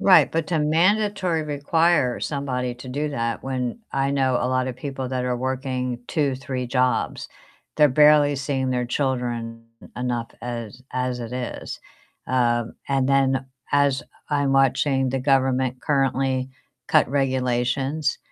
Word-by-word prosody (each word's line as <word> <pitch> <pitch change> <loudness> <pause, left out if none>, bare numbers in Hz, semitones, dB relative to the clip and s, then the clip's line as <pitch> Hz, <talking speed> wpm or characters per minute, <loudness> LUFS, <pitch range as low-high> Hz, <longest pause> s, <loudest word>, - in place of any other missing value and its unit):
Right, 190 -2 +6
but 165 -1 -1
to 165 -3 +1
mandatory 185 +2 +2
require 150 -2 +1
somebody 130 -4 -2
to 125 +1 -10
do 145 +4 -2
that 115 -5 -2
when 130 - -3
I 135 0 +1
know 135 -2 +1
a 125 - +1
lot 130 0 0
of 125 - -5
people 135 -1 -5
that 130 -1 -2
are 125 -1 0
working 130 -1 -2
2, 145 -4 0
3 130 -1 -4
jobs, 125 -1 0 0.5
they're 150 -1 +6
barely 150 +1 +5
seeing 135 -1 -1
their 125 -1 0
children 120 -3 -2 0.3
enough 120 -1 -2
as 120 0 -6
as 125 -1 -1
it 115 0 -6
is. 125 -1 -5 0.5
Um, 120 -2 +1
and 135 -1 +1
then 135 -1 +2 0.3
as 140 -1 +3 0.3
I'm 140 -2 +1
watching 135 0 +2
the 135 - -1
government 130 -1 +1
currently 135 -2 +1 0.4
cut - - +4
regulations, 130 +2 0
130 Hz, 140 wpm, -23 LUFS, 125-140 Hz, 0.5 s, Right